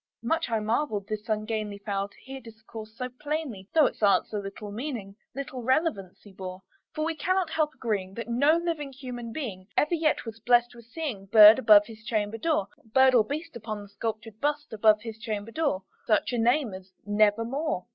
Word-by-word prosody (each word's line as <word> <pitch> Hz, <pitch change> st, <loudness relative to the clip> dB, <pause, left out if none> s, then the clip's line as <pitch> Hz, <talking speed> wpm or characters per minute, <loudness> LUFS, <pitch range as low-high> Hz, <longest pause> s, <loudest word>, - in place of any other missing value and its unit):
Much 325 Hz, +6 st, 0 dB
I 225 Hz, -1 st, +1 dB
marvelled 215 Hz, -2 st, -1 dB
this 215 Hz, +1 st, -5 dB
ungainly 215 Hz, -1 st, -2 dB
fowl 200 Hz, -1 st, -3 dB
to -, -, -23 dB
hear 265 Hz, 0 st, -8 dB
discourse 220 Hz, -1 st, -11 dB
so 250 Hz, -, -3 dB
plainly, 265 Hz, -6 st, -5 dB
Though 310 Hz, -2 st, +7 dB
its -, -, -2 dB
answer 210 Hz, +1 st, +2 dB
little 200 Hz, +1 st, -8 dB
meaning 220 Hz, -4 st, -5 dB, 0.2 s
little 270 Hz, -2 st, -5 dB
relevancy 235 Hz, -, -1 dB
bore; 185 Hz, -1 st, -8 dB, 0.3 s
For 310 Hz, 0 st, -1 dB
we 325 Hz, 0 st, -1 dB
cannot 370 Hz, +2 st, 0 dB
help 310 Hz, -1 st, 0 dB
agreeing 195 Hz, -5 st, -3 dB
that 230 Hz, -, -5 dB
no 280 Hz, +7 st, +3 dB
living 330 Hz, -5 st, -3 dB
human 250 Hz, -3 st, -7 dB
being 210 Hz, -9 st, -6 dB
Ever 300 Hz, +4 st, +2 dB
yet 315 Hz, -5 st, +1 dB
was 225 Hz, -1 st, -8 dB
blest 240 Hz, +1 st, +3 dB
with 235 Hz, -2 st, -14 dB
seeing 235 Hz, -7 st, -5 dB
bird 215 Hz, +3 st, +9 dB
above 210 Hz, -4 st, +7 dB
his 220 Hz, -1 st, -12 dB
chamber 215 Hz, -1 st, -2 dB
door 305 Hz, -8 st, +1 dB, 0.2 s
Bird 260 Hz, +4 st, +4 dB
or 235 Hz, -3 st, +6 dB
beast 290 Hz, +5 st, -5 dB
upon 215 Hz, -2 st, -5 dB
the 200 Hz, -, -14 dB
sculptured 220 Hz, +1 st, -5 dB
bust 295 Hz, -2 st, -1 dB
above 215 Hz, 0 st, +4 dB
his 225 Hz, -2 st, -7 dB
chamber 215 Hz, 0 st, -4 dB
door, 285 Hz, -10 st, 0 dB
With -, -, -38 dB
such 215 Hz, +3 st, +2 dB
name 240 Hz, 0 st, +2 dB
as 185 Hz, 0 st, -10 dB
"Nevermore." 215 Hz, -, +1 dB
225 Hz, 185 wpm, -27 LUFS, 210-275 Hz, 0.3 s, bird